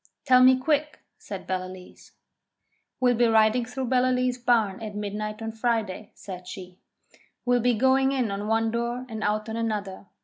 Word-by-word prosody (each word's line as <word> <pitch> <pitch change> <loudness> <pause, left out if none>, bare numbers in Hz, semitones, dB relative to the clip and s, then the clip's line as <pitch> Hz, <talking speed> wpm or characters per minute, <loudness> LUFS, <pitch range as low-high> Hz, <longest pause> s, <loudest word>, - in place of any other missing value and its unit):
'Tell 255 -2 +6
me 255 0 +7
quick,' 300 +2 0 0.2
said 195 -2 -8
Ballaleece. 185 0 -7 0.9
'We'll 250 -1 +3
be 240 0 +3
riding 225 +2 +3
through 255 +2 -4
Ballaleece 250 0 +1
barn 225 -5 +2
at 215 -2 -6
midnight 210 +1 -4
on 225 - -3
Friday,' 220 -3 -2
said 180 -2 -9
she. 185 -1 -9 0.7
'We'll 245 0 +3
be 245 0 +2
going 265 +3 +3
in 255 -6 0
on 200 +1 -4
one 225 0 +1
door 235 +2 -2
and 220 -3 -6
out 215 +1 0
on 220 - -4
another. 205 -4 -3
225 Hz, 165 wpm, -26 LUFS, 210-250 Hz, 0.9 s, me